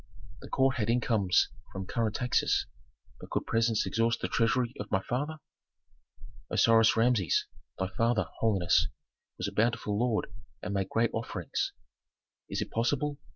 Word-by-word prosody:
"The - - -11
court 135 0 +2
had 110 -2 0
incomes 110 -6 +2 0.2
from 95 0 -5
current 110 +1 -1
taxes. 125 -1 +1 0.5
But - - -11
could - - -1
presents 115 -1 +1
exhaust 115 0 +1
the - - -2
treasury 120 +1 +1
of 105 0 -5
my 95 - +2
father?" 145 +6 -2 1.1
"Osiris 115 -1 +5
Rameses, 115 -6 +3 0.3
thy 95 0 -1
father, 115 +1 +1
holiness, 100 -6 +3 0.5
was - - -2
a - - -4
bountiful 110 -2 0
lord 115 -2 0 0.3
and 100 - -3
made 95 -1 -1
great 115 0 +1
offerings." 115 +1 -3 0.8
"Is - - -1
it - - -12
possible? 140 +5 0
115 Hz, 145 wpm, -30 LUFS, 105-120 Hz, 1.1 s, Osiris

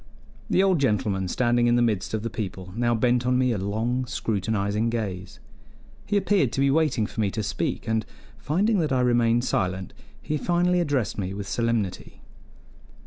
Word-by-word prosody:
The 190 - +3
old 190 -4 +3
gentleman, 105 -7 0
standing 120 +4 +2
in 120 - +4
the 120 - +3
midst 110 -2 0
of 110 - -3
the 115 - -2
people, 95 -5 -6
now 120 0 +1
bent 120 +1 +2
on 125 0 +3
me 130 -1 +2
a 110 - -1
long, 115 +6 -1
scrutinizing 110 -2 -1
gaze; 95 -5 -4 0.7
he 205 - +1
appeared 190 - +2
to - - -2
be 135 0 +3
waiting 150 -7 +2
for 110 - -4
me 100 - +1
to 110 +2 -3
speak, 100 - -3
and, 110 0 +1 0.4
finding 190 - +1
that 155 -4 0
I 130 -1 +2
remained 120 -1 +3
silent, 95 -4 -1 0.3
he 150 - -2
finally 180 +2 +2
addressed 140 -11 -1
me 95 0 -3
with 100 -1 -5
solemnity. 115 -4 -2
115 Hz, 180 wpm, -25 LUFS, 105-130 Hz, 0.7 s, in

